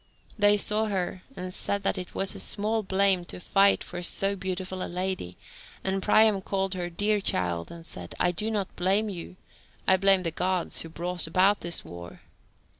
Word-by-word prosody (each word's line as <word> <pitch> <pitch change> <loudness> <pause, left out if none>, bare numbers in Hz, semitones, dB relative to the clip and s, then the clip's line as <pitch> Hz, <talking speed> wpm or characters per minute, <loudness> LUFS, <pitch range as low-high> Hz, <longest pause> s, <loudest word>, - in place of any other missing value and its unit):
They 205 -1 +5
saw 210 +2 +2
her 185 -2 -2
and 180 0 -6
said 200 +1 -1
that 195 - +1
it 185 -2 -7
was 195 - 0
small 215 +2 0
blame 190 -2 +2
to - - -8
fight 195 +2 +3
for 175 0 -7
so 195 +3 +1
beautiful 185 -1 -4
a - - -4
lady, 180 - -3 0.5
and 190 0 0
Priam 215 0 +4
called 195 0 -1
her 175 -1 -3
"dear 205 +4 +1
child," 85 - -1
and 170 -1 -10
said, 90 - -7
"I 175 - +3
do 210 +5 -2
not 205 -4 -2
blame 195 +4 +2
you, 180 -2 -7 0.5
I 190 - +6
blame 195 -1 +3
the 165 - -1
Gods 180 +1 +1
who 165 - -7
brought 175 +1 -3
about 190 +5 +3
this 170 0 0
war." 85 0 -10
190 Hz, 185 wpm, -27 LUFS, 175-200 Hz, 0.5 s, I